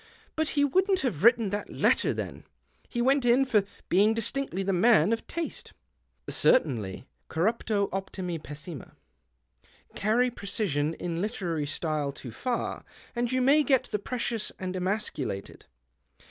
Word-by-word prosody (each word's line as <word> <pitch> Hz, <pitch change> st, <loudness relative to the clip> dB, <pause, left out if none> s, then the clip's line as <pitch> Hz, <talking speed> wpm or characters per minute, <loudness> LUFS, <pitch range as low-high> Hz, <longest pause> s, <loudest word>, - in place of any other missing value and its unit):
■ -, -, -24 dB, 0.3 s
But 315 Hz, 0 st, 0 dB
he 285 Hz, -, +5 dB
wouldn't 375 Hz, +6 st, +2 dB
have 215 Hz, -, -2 dB
written 230 Hz, -3 st, +5 dB
that 205 Hz, 0 st, -3 dB
letter -, -, +2 dB
then. -, -, -5 dB, 0.5 s
He 240 Hz, -1 st, -1 dB
went 270 Hz, +1 st, +3 dB
in 245 Hz, +3 st, +4 dB
for 215 Hz, -6 st, +2 dB, 0.2 s
being 205 Hz, +5 st, +4 dB
distinctly 230 Hz, -3 st, -1 dB
the 195 Hz, 0 st, 0 dB
man 205 Hz, 0 st, +5 dB
of 230 Hz, -, -4 dB
taste." 335 Hz, -1 st, -4 dB, 0.3 s
" -, -, -47 dB
Certainly. 115 Hz, -, +2 dB, 0.2 s
Corruptio 200 Hz, +3 st, +1 dB
optimi 185 Hz, -3 st, -3 dB
pessima. 150 Hz, -, -9 dB, 1.0 s
Carry 240 Hz, +5 st, +2 dB
precision 175 Hz, -, -1 dB
in 170 Hz, -1 st, -3 dB
literary 175 Hz, -8 st, -2 dB
style 155 Hz, -2 st, -1 dB
too 130 Hz, -3 st, -9 dB
far, 245 Hz, -, -3 dB, 0.3 s
and 240 Hz, 0 st, 0 dB
you 255 Hz, 0 st, +2 dB
may 285 Hz, +4 st, +5 dB
get 270 Hz, -4 st, +3 dB
the 210 Hz, -, 0 dB
precious 230 Hz, 0 st, -2 dB
and 185 Hz, 0 st, -4 dB
emasculated. 185 Hz, -, -3 dB
210 Hz, 145 wpm, -28 LUFS, 170-245 Hz, 1.0 s, he